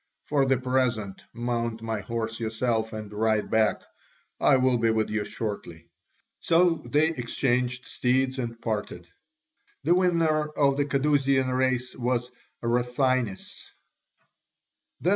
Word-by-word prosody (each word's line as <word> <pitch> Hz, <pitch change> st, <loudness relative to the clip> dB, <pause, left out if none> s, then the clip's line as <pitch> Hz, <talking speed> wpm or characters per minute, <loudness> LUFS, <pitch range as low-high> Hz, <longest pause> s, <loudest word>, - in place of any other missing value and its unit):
For 140 Hz, -2 st, +2 dB
the 135 Hz, 0 st, +3 dB
present, 125 Hz, -6 st, -1 dB
mount 115 Hz, -1 st, -3 dB
my 110 Hz, -1 st, -2 dB
horse 115 Hz, +2 st, -4 dB
yourself 110 Hz, 0 st, -1 dB
and 110 Hz, -1 st, -7 dB
ride 110 Hz, 0 st, 0 dB
back; 110 Hz, -1 st, +2 dB, 0.6 s
I 135 Hz, -, +5 dB
will 130 Hz, -1 st, +2 dB
be 115 Hz, 0 st, +2 dB
with 110 Hz, -1 st, 0 dB
you 105 Hz, -1 st, 0 dB
shortly." 85 Hz, -7 st, -6 dB, 0.5 s
So 170 Hz, 0 st, +3 dB
they 150 Hz, +2 st, +3 dB
exchanged 125 Hz, -2 st, -1 dB
steeds 130 Hz, +1 st, 0 dB
and 115 Hz, -2 st, -4 dB
parted. 105 Hz, -6 st, -4 dB, 0.8 s
The -, -, +4 dB
winner 165 Hz, -4 st, +2 dB
of 140 Hz, -2 st, +2 dB
the 145 Hz, -, +2 dB
Cadousian 135 Hz, -2 st, +2 dB
race 130 Hz, -1 st, 0 dB
was 125 Hz, 0 st, -1 dB, 0.3 s
Rathines. 125 Hz, -2 st, 0 dB
125 Hz, 120 wpm, -26 LUFS, 110-135 Hz, 0.8 s, I